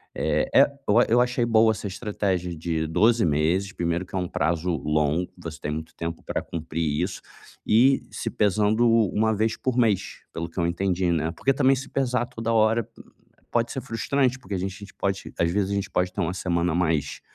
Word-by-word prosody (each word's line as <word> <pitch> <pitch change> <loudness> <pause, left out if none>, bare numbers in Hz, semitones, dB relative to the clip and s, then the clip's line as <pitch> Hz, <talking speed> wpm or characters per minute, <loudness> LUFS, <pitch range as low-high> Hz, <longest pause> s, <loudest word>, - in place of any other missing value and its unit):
É 75 0 +1 0.2
é - - +8 0.2
o 110 +4 +5
eu - - +2
eu 120 +2 +5
achei 125 0 +1
boa 110 -1 +4
essa 105 -1 -4
estratégia 95 -3 -2
de 80 0 -2
12 110 +7 +3
meses 85 +6 +1
primeiro 85 +1 -1
que 95 - -10
é - - +1
um 90 -1 -1
prazo 85 +2 -1
longo. 75 +4 0
Você 85 -2 -8
tem 75 - -4
muito 80 +1 -6
tempo 85 0 -5
pra - - -2
cumprir 80 -2 -2
isso, - - -3 0.5
e 130 +5 +4
se - - -4
pesando 105 +3 +2
1 110 -1 +2
vez 110 +2 0
por 130 -2 -1
mês, 110 -6 +1
pelo 85 - -4
que 85 - -6
eu 85 - +2
entendi, 90 0 0
né. 80 -1 0
Porque 135 - +1
também 135 0 +3
se 135 +1 -7
pesar 125 -2 0
toda 115 0 -3
hora 110 0 +3 0.6
pode 120 0 +1
ser 130 - -4
frustrante, 130 +2 0
porque 125 -5 -8
a 95 - 0
gente 95 +2 -5
pode 100 0 -3
às 85 0 +2
vezes 100 0 0
a - - 0
gente 100 -1 -2
pode 90 -1 0
ter 100 - -2
uma 85 +1 -1
semana 85 -2 0
mais 80 -4 0
95 Hz, 205 wpm, -25 LUFS, 85-115 Hz, 0.6 s, é